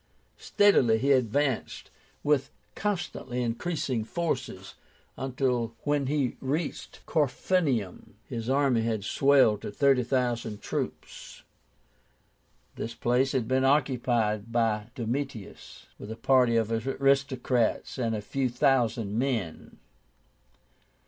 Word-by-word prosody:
Steadily 135 - +4
he 135 +5 +1
advanced, 130 +1 0 0.3
with 145 -2 +2 0.2
constantly 170 -11 -3
increasing 125 -1 -2
forces, 170 +8 -4 0.4
until 125 -3 -1
when 145 -2 0
he 140 -3 -1
reached 145 +4 -4
Corfinium 145 - -1
his 115 0 -5
army 135 -3 +2
had 110 -3 -1
swelled 135 -2 +3
to - - -5
thirty 135 +3 +3
thousand 120 -4 -1
troops. - - -6 1.3
This 115 - -5
place 125 +2 +1
had 125 -4 0
been 130 +1 +1
occupied 120 -6 +1
by 110 -2 0
Domitius 120 -2 -5
with 105 - -9
a 110 - -5
party 125 -1 +3
of 115 0 0
aristocrats 130 0 0
and 115 -2 0
a 105 - -3
few 130 +5 -1
thousand 120 -5 +1
men. 115 -11 -3
125 Hz, 105 wpm, -28 LUFS, 115-140 Hz, 1.3 s, Steadily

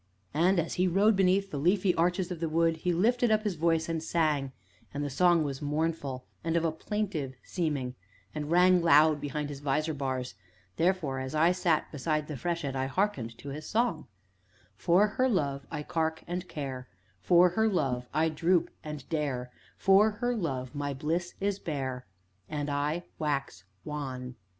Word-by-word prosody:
And, 175 +5 +3
as 165 - -2
he 185 - +4
rode 200 +5 +4
beneath 195 +1 +2
the 145 - -3
leafy 180 +4 +3
arches 175 +2 0
of 175 - -4
the 165 -1 -1
wood, 165 +1 +2
he 180 +2 -1
lifted 235 +7 +2
up 215 0 +3
his 210 -3 0
voice, 165 -1 +1
and 165 -1 -2
sang, 155 -5 0 0.4
and 145 +1 -3
the 145 - -3
song 175 +2 +4
was 140 -1 -4
mournful, 145 -3 -2 0.2
and 165 0 +1
of 165 - +1
a 165 - +2
plaintive 160 -6 -3
seeming, 145 -8 -2 0.4
and 150 -1 -4
rang 180 +1 +5
loud 155 -2 +5
behind 145 +1 -3
his 140 -2 -6
visor 150 +3 0
bars; 130 -5 -3 0.4
therefore, 165 -7 +1
as 130 +3 -4
I 165 +3 +5
sat 175 -4 +1
beside 155 +1 -1
the 150 - -5
freshet, 165 -2 -2
I 130 0 -1
hearkened 135 - -1
to 140 - -8
his 150 +2 -6
song: 225 -7 0 0.7
"For 180 +4 +4
her 255 +5 +1
love 140 - -1
I 150 - -4
carke, 160 0 -1
and 180 +1 -4
care, 130 -4 -5 0.3
For 175 - +5
her 220 +5 +1
love 135 - 0
I 160 +2 +2
droop, 170 +3 +1
and 150 -4 -7
dare, 135 -6 -2 0.3
For 195 +3 +5
her 245 +3 -1
love 135 - -3
my 145 -1 -3
bliss 165 +6 -2
is 200 0 -1
bare. 130 -6 -4 0.4
And 145 -1 -2
I 150 +4 -1 0.2
wax 140 -8 -2 0.2
wan!" 130 -4 -5
160 Hz, 175 wpm, -29 LUFS, 140-180 Hz, 0.7 s, rang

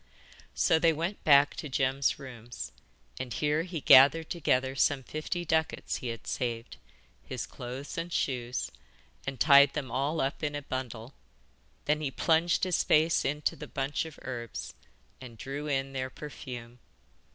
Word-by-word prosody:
So 160 - +3
they 165 0 +4
went 170 +6 -3
back 145 -1 +6
to 150 - -5
Jem's 135 +1 +1
rooms, 120 -3 -8 0.5
and 125 - -5
here 150 +4 +1
he 170 -3 -5
gathered 145 +6 +7
together 135 -5 +1
some 135 0 +2
fifty 165 +5 -4
ducats 160 0 0
he 125 - -6
had 115 -1 -5
saved, 120 -1 -3 0.5
his - - -5
clothes 130 +5 -6
and 170 +1 -5
shoes, 125 -5 -2 0.6
and 135 -1 -4
tied 140 -1 +7
them 135 -5 -4
all 140 +5 0
up 135 0 -1
in 145 -2 -2
a 145 - -4
bundle. 125 -2 -5 0.7
Then 150 +1 +1
he 150 - -1
plunged 165 +4 +2
his 185 -2 +2
face 160 +2 +3
into 150 +2 -1
the 150 +1 -8
bunch 135 +4 -2
of 160 -2 -10
herbs, 120 -3 -6 0.5
and 120 -3 -10
drew 140 +5 -5
in 135 -1 -1
their 130 -1 -2
perfume. 125 -5 -9
140 Hz, 155 wpm, -29 LUFS, 130-155 Hz, 0.7 s, gathered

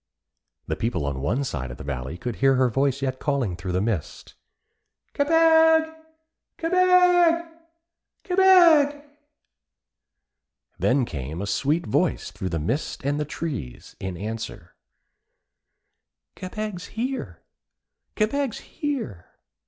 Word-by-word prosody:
The - - -2
people 115 -10 -2
on 70 -2 -3
one 120 - 0
side 70 - -4
of - - -8
the - - -9
valley 65 +3 -5
could 120 +3 -5
hear 135 0 +4
her 130 -1 +2
voice 135 +2 0
yet 130 -1 -2
calling 135 - -1
through 90 +1 -5
the 90 - +1
mist: 105 -7 -4 0.8
'Kebeg! 320 +1 +4 0.6
Kebeg! 355 -1 +4 0.8
Kebeg!' 345 -7 +5 1.8
Then 130 0 +2
came 75 - -6
a - - -5
little - - -2
sweet 145 +11 0
voice - - 0
through 95 - -5
the 85 - -2
mist 115 - -3
and 145 +1 0
the 150 - -1
trees 140 - -6
in 95 -2 -5
answer: 105 -3 -6 1.6
'Kebeg's 195 0 -6
here! 260 +3 -4 0.7
Kebeg's 255 +3 0
here!' 260 - -5
140 Hz, 115 wpm, -24 LUFS, -, 1.8 s, Kebeg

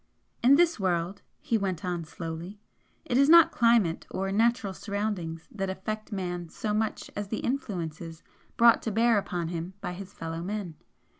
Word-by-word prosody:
"In 260 +4 +7
this 335 -4 +3
world," 180 0 -1 0.2
he 225 - 0
went 190 -4 -2
on, 175 -2 -2
slowly 165 +5 -7 0.5
"it 245 - +1
is 275 +1 +5
not 335 0 +8
climate, 230 -8 +3
or 195 0 -2
natural 225 -1 +2
surroundings 200 -6 -3
that 195 -3 -3
affect 215 +4 -5
man 175 -3 -4
so 210 +5 -3
much 215 0 -2
as 205 0 -3
the 220 - -3
influences 170 - -4 0.3
brought 235 -1 +6
to 225 - -2
bear 225 +1 +4
upon 175 -4 -3
him 175 +2 -5
by 180 - -4
his 195 +1 -8
fellow 165 -3 -5
men. 195 -2 -4
195 Hz, 165 wpm, -28 LUFS, 175-220 Hz, 0.5 s, not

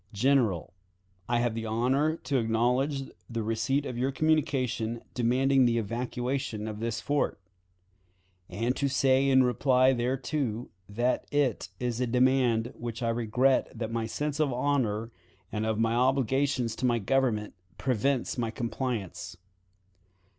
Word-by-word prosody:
"General: 110 - +1 0.6
I 120 - +2
have 120 -2 0
the 115 0 -4
honor 130 +8 +1
to 135 -2 +1
acknowledge 125 +5 +1 0.3
the 115 -2 -3
receipt 115 +6 0
of 120 -3 -4
your 130 +2 +1
communication 130 -6 0
demanding 130 +2 +3
the 115 0 +1
evacuation 120 +1 -3
of 105 -1 -5
this 115 0 -2
fort; 145 -6 -1 1.1
and 115 +7 -1
to 140 - +1
say 135 0 +3
in 130 -1 +6
reply 130 +2 +3
thereto 125 -1 -2 0.2
that 120 +5 0
it 135 -10 0
is 125 -1 -2
a 125 - +1
demand 125 -2 +3
with 120 - -9
which 120 0 -5
I 115 - +1
regret 120 +3 +2
that 115 -1 -3
my 115 -1 -1
sense 150 +5 -3
of 150 -3 +2
honor 120 -4 0 0.4
and 110 0 -2
of 110 -1 0
my 115 +1 +1
obligations 130 -1 +1
to 130 - -1
my 120 -1 +2
Government 115 -2 0 0.2
prevents 130 +1 0
my 115 -2 0
compliance. 115 -6 -4
125 Hz, 140 wpm, -28 LUFS, 115-135 Hz, 1.1 s, in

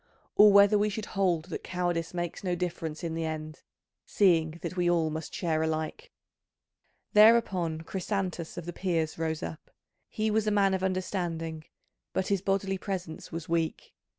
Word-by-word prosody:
Or 210 0 +8
whether 200 +1 +6
we 210 +1 +2
should 210 +1 -4
hold 180 -5 +1
that 165 - -5
cowardice 175 -2 -2
makes 175 0 -4
no 180 -2 0
difference 165 -3 -4
in 165 -1 -2
the 165 0 -2
end, 155 -1 -5 0.4
seeing 165 -5 +2
that - - -4
we 175 -1 +2
all 165 -2 +2
must 160 0 -5
share 160 -3 -1
alike?" 160 - -3 1.0
Thereupon 200 -7 +5
Chrysantas 180 -1 -3
of 175 - -5
the 175 - -5
Peers 165 -4 -1
rose 160 -1 -2
up. 80 -1 -7 0.4
He 215 0 -1
was 215 0 +1
a - - +5
man 200 -2 +3
of 190 - 0
understanding, 175 -4 -2 0.5
but 190 - -1
his 200 -2 +1
bodily 195 0 0
presence 180 -5 -5
was 165 0 -5
weak. 165 -1 -2
175 Hz, 165 wpm, -29 LUFS, 160-195 Hz, 1.0 s, Or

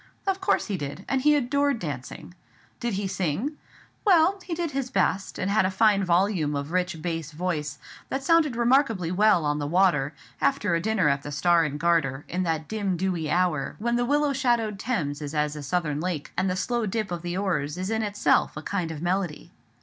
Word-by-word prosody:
Of 390 -1 0
course 380 - +2
he 200 -3 -2
did, 145 +4 -6
and 265 -1 0
he 300 +2 +5
adored 280 0 +1
dancing. 145 - -6 0.5
Did 240 -2 -2
he 200 0 -2
sing? 190 - -2 0.5
Well, 375 -1 +4
he 340 - -4
did 335 -2 -2
his 270 -2 -2
best, 200 -6 0
and 195 +2 -1
had 210 - +4
a 185 - +2
fine 200 +1 +3
volume 175 -4 +1
of 140 +2 -4
rich 180 -2 -1
bass 165 -3 -3
voice, 155 -3 -3 0.3
that 270 0 -2
sounded 310 -4 +3
remarkably 235 - +2
well 195 -3 +4
on 150 0 0
the 145 - -2
water, 155 -5 +2 0.3
after 140 +4 +1
a 165 - +1
dinner 210 -4 +1
at 140 -1 +2
the 145 - -7
Star 170 +3 +3
and 145 -2 -3
Garter, 150 -5 +1
in 180 - -2
that 160 -3 -1
dim 200 -4 -1
dewy 175 -4 -1
hour, 175 -5 0
when 235 +2 0
the 240 - +1
willow 290 +3 +2
shadowed 240 -6 0
Thames 165 - -2
is 150 +1 -5
as 150 0 0
a 150 - -6
southern 150 0 -1
lake, 170 -3 -3
and 185 +1 +1
the 185 - -1
slow 235 +3 -1
dip 215 -1 -2
of 175 -1 -3
the 175 +1 -3
oars 170 -6 -1
is 185 +3 -3
in 225 0 0
itself 205 -7 +1
a 150 - -6
kind 180 -3 -2
of 160 0 -6
melody. 180 -3 -2
185 Hz, 210 wpm, -26 LUFS, 155-230 Hz, 0.5 s, he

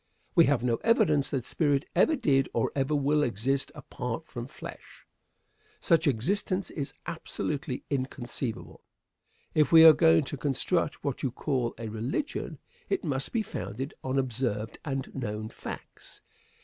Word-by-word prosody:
We 170 -2 +7
have 135 -4 +2
no 120 -2 +2
evidence 195 - +3
that 130 -4 -2
spirit 145 -3 +1
ever 320 - +4
did 135 - +2
or 115 - +1
ever 140 +2 +1
will 145 +1 +2
exist 130 +2 0
apart 125 +5 -5
from 120 -5 -7
flesh. - - -11 0.7
Such 165 -1 +3
existence 185 - 0
is 140 -3 -4
absolutely 145 -3 -4
inconceivable. 130 -3 -4 0.7
If 150 -3 +3
we 165 -1 +9
are 160 -1 +11
going 160 0 +5
to 140 - -6
construct 150 +5 0
what 140 -3 -2
you 135 - 0
call 125 -1 -1
a 115 0 -5
"religion," 115 - -3 0.3
it 390 - 0
must 135 -2 -1
be 230 -2 0
founded 135 - -5
on 130 +1 -1
observed 120 -4 -1
and 135 -2 -4
known 110 -4 -4
facts. - - -9
135 Hz, 145 wpm, -29 LUFS, 125-155 Hz, 0.7 s, are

